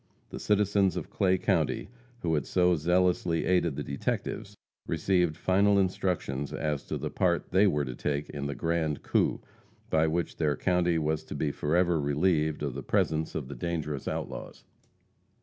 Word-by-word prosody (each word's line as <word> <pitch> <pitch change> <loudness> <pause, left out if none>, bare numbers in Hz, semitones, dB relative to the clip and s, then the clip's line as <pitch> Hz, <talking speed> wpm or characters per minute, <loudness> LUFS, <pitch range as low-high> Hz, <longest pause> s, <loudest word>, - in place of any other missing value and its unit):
The - - -6
citizens 100 -3 +2
of 85 - -5
Clay 95 -2 +2
county, - - 0 0.4
who 80 -2 +1
had 75 -4 0
so 90 -1 +3
zealously 90 0 +1
aided 90 -5 +2
the - - -3
detectives, 70 - -3 0.3
received 90 -4 +1
final 100 +3 +3
instructions 90 -8 -1
as 75 -2 -2
to - - -3
the - - -4
part 85 -2 0
they 95 +3 +5
were 75 -6 +1
to 65 - -5
take 70 +3 -2
in 70 -1 -4
the 70 - -4
grand 80 -3 -1
coup, - - +1 0.5
by 80 0 +3
which 85 +2 -2
their 75 -3 +1
county 90 -2 +1
was 80 0 0
to - - -7
be 75 0 0
forever 85 +2 +1
relieved 75 +1 +1
of 70 -3 -2
the 70 - -5
presence 80 +4 0
of - - -3
the 70 - -7
dangerous 80 -5 -3
outlaws. - - -5
80 Hz, 165 wpm, -29 LUFS, 75-90 Hz, 0.5 s, they